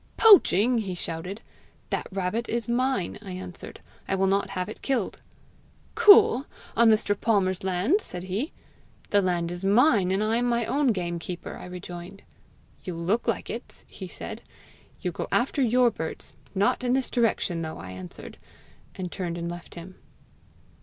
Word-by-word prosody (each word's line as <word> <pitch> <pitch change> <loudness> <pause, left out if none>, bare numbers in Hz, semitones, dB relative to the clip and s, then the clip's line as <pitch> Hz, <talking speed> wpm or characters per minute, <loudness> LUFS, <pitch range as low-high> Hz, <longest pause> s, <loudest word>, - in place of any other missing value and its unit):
'Poaching!' 250 - +6
he 195 -4 -3
shouted. 175 +5 -5 0.5
'That - - -1
rabbit 195 +5 -2
is 235 +1 -1
mine,' 240 -5 0
I 195 -3 -7
answered; 185 -1 -8 0.3
'I - - 0
will 195 0 +2
not 195 +1 +1
have 180 0 -3
it 215 - -9
killed.' 255 -7 -1 0.7
'Cool! 315 - +7 0.3
on 235 0 +6
Mr. 215 -1 +3
Palmer's 195 -4 +1
land!' 190 - +1
said 180 - -7
he. 200 - -3 0.6
'The 205 - +5
land 175 -2 0
is 175 +1 -6
mine, 205 -1 +4
and 195 +3 +1
I 220 +2 +1
am 245 - +1
my 235 -1 +1
own 275 +5 +1
gamekeeper!' 175 -4 -3
I - - -9
rejoined. 180 +1 -9 0.6
'You 180 -3 -5
look 180 +8 -1
like - - -1
it!' - - -8
he - - -9
said. - - -7 0.6
'You - - -1
go - - -5
after 285 - +1
your 245 0 +4
birds! 160 -5 -6 0.2
not 200 +6 +2
in 250 0 +1
this 265 -1 0
direction 220 -8 +1
though,' 160 -1 -5
I 95 - -8
answered, 90 -1 -10 0.6
and 180 -2 -5
turned 175 -3 -4
and 170 0 -3
left 175 0 -10
him." 180 +2 -10
195 Hz, 165 wpm, -26 LUFS, 180-235 Hz, 0.7 s, Cool